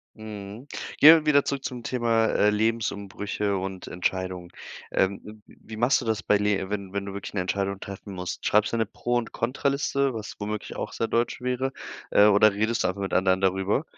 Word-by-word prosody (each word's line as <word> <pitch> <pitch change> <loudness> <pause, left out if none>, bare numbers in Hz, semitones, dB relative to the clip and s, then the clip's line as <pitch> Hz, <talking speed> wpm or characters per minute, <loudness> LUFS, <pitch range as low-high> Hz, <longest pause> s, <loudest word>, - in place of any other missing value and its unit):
Mhm, 105 +3 -9 0.3
gehen 160 +3 +10
wir - - -14
wieder 145 -2 +4
zurück 140 -1 -2
zum 125 -2 -5
Thema, 115 -2 +1
äh, 105 - +3
Lebensumbrüche 105 -2 -1
und 95 0 -5
Entscheidungen. 90 0 -3 0.4
Ähm, 95 +1 +1
w 105 - -10 0.3
wie 110 - -9
machst 120 +5 +3
du - - -6
das 110 -2 0
bei 105 - +2
le 100 -2 0
wenn 100 -2 -4
wenn 100 0 -3
du 100 - -6
wirklich 100 - -7
eine 100 - 0
Entscheidung 100 +1 -2
treffen 100 +1 -8
musst? 90 -1 -5
Schreibst 105 +2 +3
du - - +1
eine 115 - +1
Pro 120 +3 -3
und 120 -1 -1
Contra-Liste, 140 +2 0
was 110 -3 -6
womöglich 105 0 -5
auch - - -4
sehr 115 - -2
deutsch 115 +1 0
wäre, 125 +1 -1 0.4
äh, 105 - +6
oder 105 0 +6
redest 110 +3 0
du - - +2
einfach 95 +2 -5
mit 95 - -3
anderen 95 0 +3
darüber? 95 - +1
105 Hz, 200 wpm, -26 LUFS, 100-115 Hz, 0.4 s, gehen